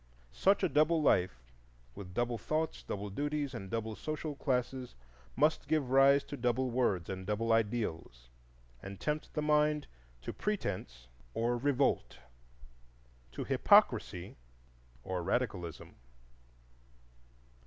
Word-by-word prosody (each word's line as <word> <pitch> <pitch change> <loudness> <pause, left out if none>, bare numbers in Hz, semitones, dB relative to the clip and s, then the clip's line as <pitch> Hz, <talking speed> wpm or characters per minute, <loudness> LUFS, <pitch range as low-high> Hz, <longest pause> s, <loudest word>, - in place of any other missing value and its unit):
Such 195 +1 +3
a - - +5
double 155 +2 +3
life, 90 - +2 0.5
with 90 +2 -10
double 120 -1 0
thoughts, 155 +7 -2
double 100 0 -5
duties, 145 +3 -2
and 95 -5 -6
double 110 0 -3
social 155 +2 -4
classes, 130 -2 -2 0.4
must 150 +5 +2
give 145 -5 0
rise 140 +1 +6
to - - -7
double 125 0 0
words 110 -8 +1
and 95 -1 -5
double 115 +2 +1
ideals, 105 - -1 0.5
and 95 0 -8
tempt 150 0 -2
the 150 - 0
mind 150 -1 +2 0.4
to - - -5
pretence 80 - -3 0.3
or 120 +2 +1
revolt, 135 +2 +1 1.2
to - - -4
hypocrisy - - +3 0.7
or 95 -1 -3
radicalism. 90 - -2
125 Hz, 115 wpm, -33 LUFS, 100-150 Hz, 1.2 s, rise